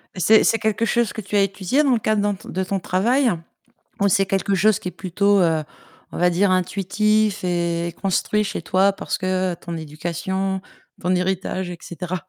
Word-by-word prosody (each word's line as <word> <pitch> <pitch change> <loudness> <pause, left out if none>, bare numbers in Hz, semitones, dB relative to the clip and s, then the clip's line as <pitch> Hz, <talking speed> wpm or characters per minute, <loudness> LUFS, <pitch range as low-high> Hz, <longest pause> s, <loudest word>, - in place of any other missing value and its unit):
C'est 215 +4 +5
c'est 225 - +2
quelque 220 0 0
chose 235 0 +1
que 220 - -6
tu 200 +1 -5
as 200 - +5
étudié 195 +8 +1
dans 280 - +2
le 235 - +2
cadre 215 -1 +1
dans 205 -1 0
ton - - -13
de 190 - -2
ton 195 +1 -2
travail 235 +9 +2 0.7
ou 200 - +4
c'est 195 0 +3
quelque 195 0 0
chose 215 +1 +3
qui - - -4
est - - -4
plutôt, 200 +2 +1
heu, 160 -3 +2 0.5
on - - -6
va 180 0 +3
dire, 185 +3 +2
intuitif 200 +3 +1
et 170 -1 -1
construit 205 +2 +1
chez 200 - -4
toi 185 +4 +2
parce - - -4
que 185 -1 0
ton 170 0 -7
éducation, 175 +5 -3 0.4
ton 180 +1 +1
héritage 185 0 -1
et 175 - -7
cetera? 180 +1 -6
190 Hz, 195 wpm, -22 LUFS, 180-205 Hz, 0.7 s, C'est